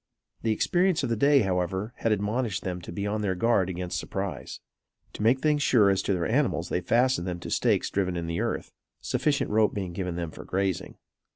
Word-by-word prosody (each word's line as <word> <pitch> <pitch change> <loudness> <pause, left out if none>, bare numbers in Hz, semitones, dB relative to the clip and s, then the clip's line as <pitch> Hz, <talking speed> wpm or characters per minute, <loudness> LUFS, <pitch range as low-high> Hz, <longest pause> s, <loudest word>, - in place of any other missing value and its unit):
The 115 - -1
experience 175 - +2
of 130 - -1
the 115 - +1
day, 140 +5 +4
however, 95 +2 -1
had 115 - 0
admonished 105 0 -1
them 90 -1 -3
to 85 - -8
be 100 +3 -3
on 105 +1 -1
their 95 -3 0
guard 95 -2 +2
against 90 -1 -3
surprise. 95 -1 -5 0.5
To - - -7
make 120 +5 +3
things 150 -1 +2
sure 110 -8 +5
as 95 - +1
to 100 - 0
their 85 -3 -1
animals, 115 - 0
they 90 - 0
fastened 120 0 +2
them 90 -1 -3
to - - -6
stakes - - +1
driven 90 -3 0
in 85 - -3
the 85 0 -2
earth, - - -3 0.3
sufficient 145 -7 0
rope 110 0 +3
being 95 -4 -3
given 90 -1 -3
them 85 -2 -4
for - - -10
grazing. 95 -1 -2
100 Hz, 210 wpm, -27 LUFS, 90-115 Hz, 0.5 s, sure